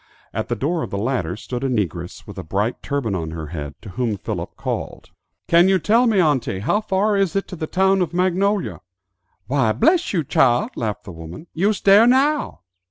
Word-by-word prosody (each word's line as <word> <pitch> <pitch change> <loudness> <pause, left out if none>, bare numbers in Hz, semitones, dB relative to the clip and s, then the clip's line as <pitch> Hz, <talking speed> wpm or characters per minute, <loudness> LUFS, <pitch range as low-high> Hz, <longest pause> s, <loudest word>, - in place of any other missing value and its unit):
At - - -3
the - - -1
door 165 +4 -1
of - - -4
the 100 - -4
latter 105 -6 -1
stood 125 +3 -5
a 135 - 0
negress 90 -7 -3
with 100 -2 -9
a - - -5
bright 100 +8 -2
turban 140 -7 -2
on 80 -4 -3
her 80 -1 -6
head, 75 -3 -6
to 110 - -9
whom 110 +2 -2
Philip - - -5
called, - - -5 0.4
"Can 170 +2 +5
you 190 - +4
tell 230 +7 +3
me, 215 -4 +3
auntie, 145 - +1
how 205 - +1
far 205 0 +1
it 200 - +2
is 195 -4 0
to 195 -1 -3
the 155 -2 -4
town 190 +2 +2
of 180 - -1
Magnolia?" 185 +3 0 0.6
"Why, 125 -2 +1
bress 340 - +2
you 170 -5 0
chile," 125 -2 +2
laughed 110 -3 -3
the 95 - -9
woman, 80 - -10
"you's 200 +5 0
dere 200 +4 +6
now." 275 - +2
145 Hz, 205 wpm, -21 LUFS, -, 0.6 s, dere